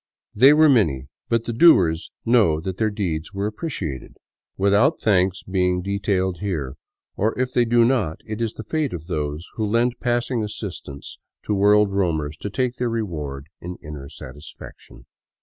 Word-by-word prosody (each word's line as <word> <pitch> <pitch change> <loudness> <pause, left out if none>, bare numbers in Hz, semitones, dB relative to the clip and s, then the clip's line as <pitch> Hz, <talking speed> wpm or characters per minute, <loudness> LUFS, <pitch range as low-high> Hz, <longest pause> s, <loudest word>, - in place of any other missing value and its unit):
They 130 +7 +7
were 155 +1 +6
many; 80 - +2 0.2
but 115 -1 +1
the 120 - -4
doers 95 - +5 0.2
know 110 -10 +4
that 95 +3 -5
their 110 -1 +1
deeds 90 -4 -3
were 100 +1 -1
appreciated, 105 - -5 0.4
without 100 +10 +3
thanks 95 -3 +1
being 90 -1 0
detailed 95 -2 -1
here; 80 -10 -3 0.4
or 110 +3 0
if 130 0 -1
they 120 - +3
do 120 0 +4
not, 110 -11 0
it 110 +1 -5
is 115 -2 -1
the 110 - -8
fate 155 - -2
of 80 -2 -6
those 75 -1 -3
who 110 - -1
lend 120 +3 +1
passing 120 -1 0
assistance 95 -9 -7 0.2
to 105 - -1
world 105 0 +4
roamers 80 -6 -1
to 105 - -5
take 125 +3 -2
their 125 -1 -1
reward 75 -12 -4 0.2
in 90 +1 -6
inner 75 -2 -8
satis 75 0 -11
faction. - - -13
100 Hz, 165 wpm, -22 LUFS, 80-115 Hz, 0.4 s, They